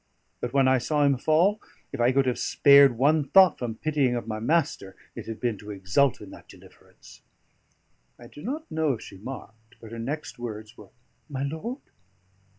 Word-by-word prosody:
But 120 - -4
when 135 -1 +3
I 130 0 +3
saw 150 +4 0
him 140 -1 +3
fall, 165 - +2 0.3
if - - -5
I 120 +2 +4
could 135 +1 +2
have 125 -2 -1
spared 140 -3 +5
one 150 +4 +3
thought 190 -3 +6
from 120 -3 -4
pitying 145 -3 0
of 120 - -4
my 110 -1 -4
master, 120 - -1 0.2
it - - -9
had 115 -1 -6
been 115 -5 -2
to 105 - -12
exult 100 +7 0
in 105 - -11
that - - -14
deliverance." - - -18 1.0
I 120 - -14
do 145 - -13
not 300 - -6
know 155 -3 0
if 115 - -7
she 95 - -12
marked; 115 -1 -10
but 115 -1 -12
her 115 - -7
next 135 +1 -5
words 110 -2 -7
were, - - -15 0.4
"My 135 -2 -4
lord?" 160 - -5
130 Hz, 190 wpm, -26 LUFS, 115-150 Hz, 1.0 s, thought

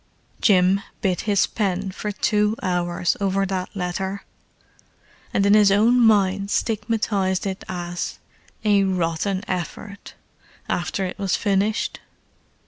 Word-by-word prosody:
Jim 190 -1 +4 0.2
bit 185 -3 0
his 200 -1 +4
pen 195 -2 -2
for 210 +2 -4
two 210 +1 +1
hours 175 -1 0
over 195 0 +1
that 185 -1 -3
letter, 190 +2 -3 1.1
and 195 - +1
in 200 - +5
his 210 -2 +6
own 225 +5 +4
mind 200 -3 +3
stigmatized 210 -4 0
it 190 -1 -4
as 175 -1 -4 0.5
"a 205 -2 +4
rotten 185 +1 -1
effort," 195 +3 -6 0.5
after 180 +2 -1
it 185 - -6
was 195 -2 +1
finished. 205 +1 0
195 Hz, 120 wpm, -23 LUFS, 185-205 Hz, 1.1 s, his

